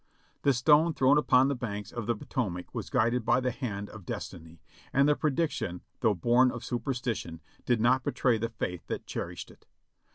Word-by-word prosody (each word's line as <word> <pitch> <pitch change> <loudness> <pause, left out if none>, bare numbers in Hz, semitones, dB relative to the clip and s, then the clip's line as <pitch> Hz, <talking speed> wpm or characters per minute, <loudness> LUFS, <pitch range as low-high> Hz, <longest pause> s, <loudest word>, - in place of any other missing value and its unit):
The 140 - +4
stone 150 +6 +4
thrown 135 +3 +5
upon 130 -2 +4
the 140 - +1
banks 105 -6 -5
of 120 -3 -5
the 120 - +1
Potomac 100 -6 -4
was - - -5
guided 120 +2 +1
by 125 - +3
the 130 0 0
hand 105 -6 -4
of 110 -3 -11
Destiny, 80 -1 -7 0.3
and 140 +1 +4
the 150 - +4
prediction, 150 - -1 0.2
though 110 -3 +2
born 120 +7 +4
of 120 - -6
super 125 +3 -2
stition, 115 -10 -4 0.3
did 120 -2 +3
not 125 +3 +3
betray 120 -4 +1
the 115 +1 -2
faith 90 -6 -4
that - - -4
cherished - - -6
it. - - -22
120 Hz, 190 wpm, -29 LUFS, 105-130 Hz, 0.3 s, thrown